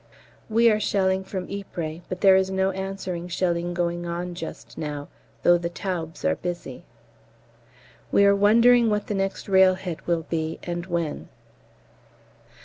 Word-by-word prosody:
We 230 +2 +4
are 215 - +2
shelling 190 -2 +1
from 190 -1 -5
Ypres, 170 -5 -5
but 180 - -5
there 195 -2 +7
is 190 0 +2
no 190 0 +1
answering 190 -2 -5
shelling 175 -1 -1
going 175 0 -1
on 175 +1 -4
just 170 -1 -8
now, 145 -2 -5 0.3
though 175 0 +5
the 170 0 -3
Taubes 170 -3 -5
are - - +3
busy. 175 -7 -5 1.3
We 200 - +5
are 200 0 +5
wondering 230 +3 +5
what 210 -1 0
the - - -3
next 195 0 -2
railhead 190 -3 +2
will 170 -2 +1
be, 160 -1 -2
and 175 0 -4
when. 170 -4 -3
180 Hz, 145 wpm, -25 LUFS, 170-195 Hz, 1.3 s, there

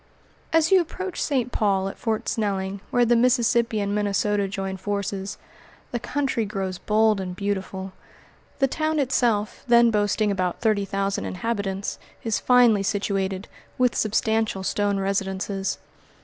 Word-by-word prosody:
As 325 +1 +3
you 380 -1 +7
approach 370 +2 -5
St. 255 -4 0
Paul, 195 -4 +1
at 195 - -7
Fort 220 -2 -2
Snelling, 195 -2 -2
where 245 0 +3
the 240 +1 +4
Mississippi 235 -2 +3
and 200 0 -1
Minnesota 205 0 +1
join 195 -1 -4
forces, 200 0 -3 0.5
the 240 - -2
country 270 -2 -1
grows 195 -3 -3
bold 215 -1 +2
and 180 -1 -5
beautiful. 190 -1 -3 0.6
The 270 - +3
town 310 +3 -1
itself, 240 -6 +1
then 235 -1 +6
boasting 210 0 +1
about 185 -2 -1
thirty 215 -3 +1
thousand 195 0 -2
inhabitants, 200 0 -3 0.2
is 225 -2 0
finely 245 -5 +5
situated, 195 -1 -1 0.3
with 250 -1 +3
substantial 220 -2 0
stone 205 +1 0
residences. 195 0 -2
205 Hz, 135 wpm, -24 LUFS, 195-235 Hz, 0.6 s, you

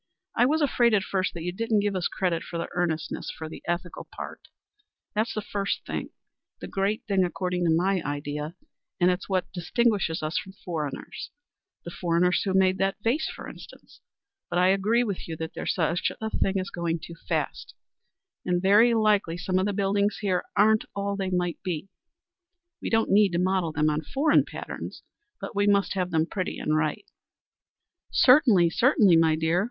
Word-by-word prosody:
I 245 - +4
was 310 +2 +2
afraid 240 -5 +3
at 200 - +2
first 190 -2 -1
that 165 - -5
you 180 - -2
didn't 220 +2 0
give 205 -1 -1
us 180 -2 0
credit 175 -3 -1
for 170 - -6
the 170 - -3
earnestness 165 -2 -2
for 160 - -6
the 155 - -9
ethical 175 0 -3
part. - - -8 0.7
That's 220 +2 -1
the 215 - -2
first 200 0 -3
thing, - - -4 0.5
the - - -7
great 195 +2 -1
thing 195 -3 +2
according 180 0 -1
to - - +3
my 185 +3 +2
idea, 145 +2 -4 0.4
and 180 0 +4
it's 180 +2 -4
what 185 -2 -1
distinguishes 190 -2 0
us 155 +1 0
from 190 - -10
foreigners, 155 -5 -5 0.6
the 170 - -6
foreigners 175 +1 +1
who 190 -2 -1
made 190 0 +3
that 195 0 +1
vase, 255 +8 +1
for - - -8
instance. - - -13 0.5
But - - -1
I 180 +1 +4
agree 210 +5 +3
with 200 -6 -4
you 160 -1 -5
that 160 +1 -5
there's - - -2
such 170 0 0
a 220 0 -3
thing 195 0 0
as 185 - -4
going 170 -1 -1
too 165 +1 -9 0.2
fast, - - -2 0.7
and 180 -1 +1
very 210 +6 +5
likely 210 -6 +2
some 185 +1 0
of 190 - +1
the - - 0
buildings 200 +1 +1
here 185 -3 0
aren't 215 +1 +4
all 200 0 -1
they 195 -1 -2
might 180 -1 -1
be. 185 -1 -4 0.9
We - - -3
don't 225 0 +2
need 200 -2 +5
to - - +1
model 185 -2 +1
them 155 0 +1
on 150 +1 -1
foreign 280 - +2
patterns, - - -7 0.4
but - - -7
we 205 0 +2
must 200 -1 +3
have 185 -2 -1
them 160 -2 +2
pretty 185 +1 -3
and 155 - 0
right." 155 -1 -1 1.0
"Certainly, 235 - +5
certainly, 215 - +4
my 165 -1 +4
dear. 160 +2 +1
185 Hz, 185 wpm, -26 LUFS, 170-205 Hz, 1.0 s, very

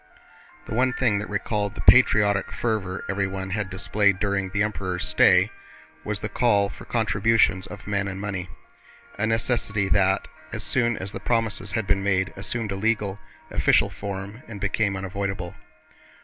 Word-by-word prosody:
The - - -6
one 125 +2 +2
thing 115 -6 +1
that 105 - -6
recalled 105 0 -2
the - - -4
patriotic 100 -2 +5
fervor 100 -5 -2
everyone 95 -1 -2
had 100 -1 -2
displayed 100 +1 +1
during 100 -2 0
the 100 +2 +1
Emperor's 95 -4 -2
stay - - +5 0.5
was 105 -1 -3
the - - -2
call 105 -2 +2
for - - -11
contributions 105 -3 +2
of 105 +1 -10
men 100 -1 -1
and 95 0 -5
money, 95 -3 -4 0.7
a 110 - +1
necessity 110 -3 0
that 95 0 +2 0.2
as - - -5
soon 120 -3 +1
as 95 +1 -5
the - - -6
promises 110 -5 -1
had 110 0 0
been 100 0 +1
made 95 -1 +1
assumed 105 +2 -3
a - - -2
legal, 105 -1 0 0.3
official - - +3
form 100 +3 -6
and 105 -3 -8
became 100 0 0
unavoidable. 95 -1 -4
100 Hz, 160 wpm, -25 LUFS, 95-105 Hz, 0.7 s, patriotic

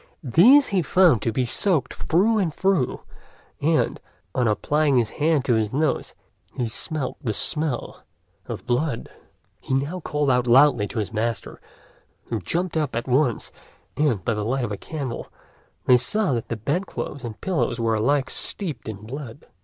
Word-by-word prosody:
These 235 - +6
he 195 -3 +2
found 165 - +4
to 115 - 0
be 125 +3 0
soaked 145 - +1
through 210 +7 +2
and 180 -5 0
through, 190 -5 0 0.6
and, 155 +2 +1 0.3
on 125 -2 +1
applying 145 +6 +2
his 115 -3 +1
hand 155 -3 +2
to 125 - +2
his 110 -2 +1
nose, 150 +1 -1 0.4
he 120 - -1
smelt 150 +5 -3
the 115 -5 -1
smell 150 +4 -2 0.5
of - - -6
blood. 125 +1 -1 0.5
He 130 - -2
now 145 +7 -1
called 150 -4 0
out 125 -1 +2
loudly 125 -3 +5
to 120 - -8
his 110 0 -2
master, 115 0 -3 0.7
who 115 - -1
jumped 170 - -2
up 150 -6 -1
at 120 +2 -3
once; 130 -2 +1 0.4
and, 135 - +1
by 115 - +1
the 105 -1 -2
light 125 +3 0
of 110 - -5
a - - -1
candle, 135 +2 -6 0.5
they 125 - +6
saw 170 - +1
that 115 -2 -2
the 115 - -3
bed 145 - -1
clothes 140 - -6
and 115 -3 -7
pillows 130 -10 -1
were 115 -1 +1
alike 135 +6 +1
steeped 155 - -3
in 105 -1 -8
blood. 135 +2 -8
135 Hz, 170 wpm, -23 LUFS, 115-155 Hz, 0.7 s, These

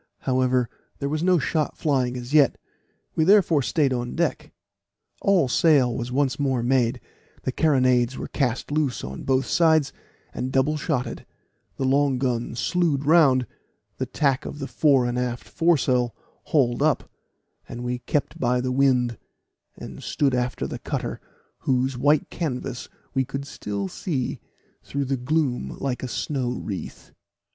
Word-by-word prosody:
However, 130 -1 +1 0.3
there 140 - -3
was 155 +1 -1
no 180 +1 +4
shot 155 +1 -1
flying 130 -5 0
as 125 +3 -7
yet, 145 -4 +5 0.6
we 160 - +2
therefore 175 -5 +5
stayed 140 0 +1
on 120 -1 -3
deck. 170 0 -1 0.7
All 195 -8 +3
sail 130 -3 +3
was 120 +1 -4
once 140 +1 0
more 130 -4 0
made; 125 -2 +2 0.4
the - - -1
carronades 130 -4 +2
were - - -5
cast 130 -1 -1
loose 145 -4 0
on 65 +1 -6
both 135 0 +1
sides, 160 -4 +3 0.4
and 130 - -3
double 135 +4 +2
shotted, 135 -5 -3 0.5
the 135 - -1
long 135 0 +2
gun 120 -3 -1
slewed 150 +1 0
round, 140 -5 +5 0.5
the 130 - -2
tack 135 +1 +1
of - - -7
the 135 - -4
fore 140 -3 +3
and 120 0 -1
aft 120 -1 -3
foresail 130 -8 +2 0.3
hauled 130 -5 +2
up, 155 -1 +2 0.6
and 120 +1 -6
we 125 0 -2
kept 150 +5 -2
by 125 -1 +2
the 130 +1 -1
wind, 125 -4 +2 0.6
and - - -9
stood 140 -3 0
after 125 - -1
the - - -5
cutter, - - -4 0.4
whose 130 0 0
white 145 +4 +2
canvas 130 -6 -4 0.2
we 135 -1 +2
could 135 +2 -5
still 100 -7 -4
see 130 - -3 0.4
through 140 0 -3
the 135 +1 0
gloom 135 0 -1
like 135 -3 -2
a 130 - -3
snow 130 -1 -2
wreath. 100 -6 -7
130 Hz, 150 wpm, -24 LUFS, 125-150 Hz, 0.7 s, yet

